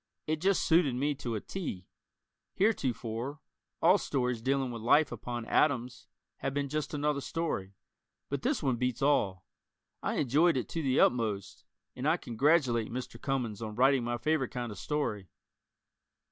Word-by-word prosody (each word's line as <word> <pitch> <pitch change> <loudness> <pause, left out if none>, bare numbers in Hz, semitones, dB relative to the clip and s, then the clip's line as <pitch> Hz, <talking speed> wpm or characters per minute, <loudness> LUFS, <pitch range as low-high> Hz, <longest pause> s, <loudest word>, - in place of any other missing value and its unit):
It 155 0 -1
just 195 +1 +2
suited 160 -6 +3
me 145 +4 +1
to 120 -4 -4
a - - -1
"T." 125 - -5 0.7
Heretofore, 130 - -1 0.4
all - - +6
stories 125 -4 -1
dealing 135 +1 0
with 115 -2 -6
life 145 +6 +4
upon 120 -1 -5
atoms 120 -3 +1 0.3
have 135 0 -3
been 140 -1 -1
"just 150 +1 -2
another 145 -1 0
story," 100 - -3 0.5
but 140 - -3
this 250 - 0
one 130 -4 +1
beats 125 +1 -1
all. 100 -11 +2 0.6
I - - -1
enjoyed 150 +5 +3
it 120 - -2
to 165 - -2
the 135 -3 +2
utmost, 110 -5 +1 0.3
and 130 +3 -2
I 160 +3 +4
congratulate 125 -3 +2
Mr. 125 +1 -6
Cummings 120 -6 -2
on 110 -1 -5
writing 130 +1 +4
my 120 0 -1
favorite 155 -1 0
kind 120 -3 -4
of 105 - -8
story. 105 - -2
130 Hz, 160 wpm, -31 LUFS, 120-150 Hz, 0.7 s, all